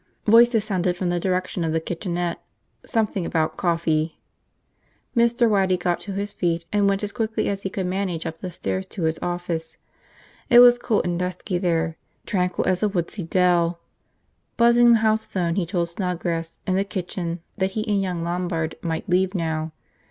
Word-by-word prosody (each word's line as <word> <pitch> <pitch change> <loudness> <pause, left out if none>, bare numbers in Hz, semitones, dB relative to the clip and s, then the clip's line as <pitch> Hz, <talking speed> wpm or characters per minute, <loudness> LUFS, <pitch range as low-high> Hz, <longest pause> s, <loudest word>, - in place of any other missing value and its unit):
Voices 230 0 +6
sounded 180 -3 0
from 180 -1 -1
the 175 0 0
direction 185 -1 -1
of 160 -1 -1
the 165 - +2
kitchenette, 175 +1 -3 0.4
something 215 -5 -1
about 160 -1 0
coffee. 165 -2 0 1.0
Mr. 235 0 +3
Waddy 190 -4 +2
got 175 -1 0
to 200 - -6
his 200 +1 -3
feet 170 -1 -1
and 205 -1 +3
went 195 +1 0
as 205 - -2
quickly 225 -1 -1
as 200 -1 -2
he 195 - -3
could 190 0 -3
manage 180 -3 -2
up 165 0 -5
the 185 - -5
stairs 95 - -3
to 180 - -6
his 160 0 0
office. 170 -2 -3 0.7
It 240 - +7
was 245 0 +8
cool 220 -3 +1
and 175 -1 -1
dusky 180 +1 -2
there, 165 -2 0 0.3
tranquil 180 -2 0
as 180 -1 +1
a 210 - +2
woodsy 190 +1 -3
dell. 175 -1 +2 0.8
Buzzing 235 0 +6
the 230 - +4
house 220 0 +2
phone 180 -5 -1
he 180 -2 -1
told 170 -1 -1
Snodgrass, 170 -2 -3
in 185 - 0
the 195 +1 +2
kitchen, 180 -3 -4 0.2
that 190 0 0
he 215 +2 -1
and 205 -2 +2
young 180 -3 -2
Lombard 170 -2 -2
might 165 +3 -3
leave 185 +1 +1
now. 160 -2 -2
180 Hz, 180 wpm, -23 LUFS, 170-200 Hz, 1.0 s, was